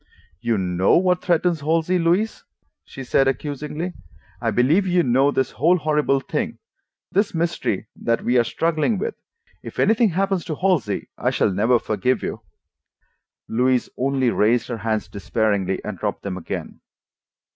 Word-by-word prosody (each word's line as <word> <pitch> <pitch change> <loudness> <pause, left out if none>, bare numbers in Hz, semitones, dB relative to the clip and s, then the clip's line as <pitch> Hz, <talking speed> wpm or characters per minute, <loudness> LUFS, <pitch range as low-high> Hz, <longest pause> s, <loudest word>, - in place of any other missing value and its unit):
"You 115 -2 +1
KNOW 90 0 +2
what 180 0 +2
threatens 175 -1 +1
Halsey, 165 +4 +1
Louise," 175 +7 +1 0.4
she 135 - -9
said 135 +2 +2
accusingly. 150 +5 -3 0.5
"I - - +1
believe 155 +11 +3
you 180 -1 +3
know 130 +3 +3
this 135 -2 0
whole 170 +7 +3
horrible 150 -3 +1
thing, 230 - -3 0.5
this 200 -2 +1
mystery 165 - -1
that 115 0 -1
we 125 +1 +3
are - - +4
struggling 165 - 0
with. 195 - -2 0.5
If - - -10
anything 225 +1 +3
happens 195 0 0
to 155 - -3
Halsey, 170 - 0
I - - +1
shall - - +1
never 110 +6 +3
forgive 125 +3 -1
you." - - -4 1.1
Louise 125 +2 +1
only 130 -1 +1
raised 115 +3 +2
her 120 - -3
hands 110 0 -2
despairingly 100 -2 -1
and 105 -4 -5
dropped 105 -2 -3
them 100 -2 -3
again. 90 - -6
140 Hz, 150 wpm, -22 LUFS, 115-175 Hz, 1.1 s, are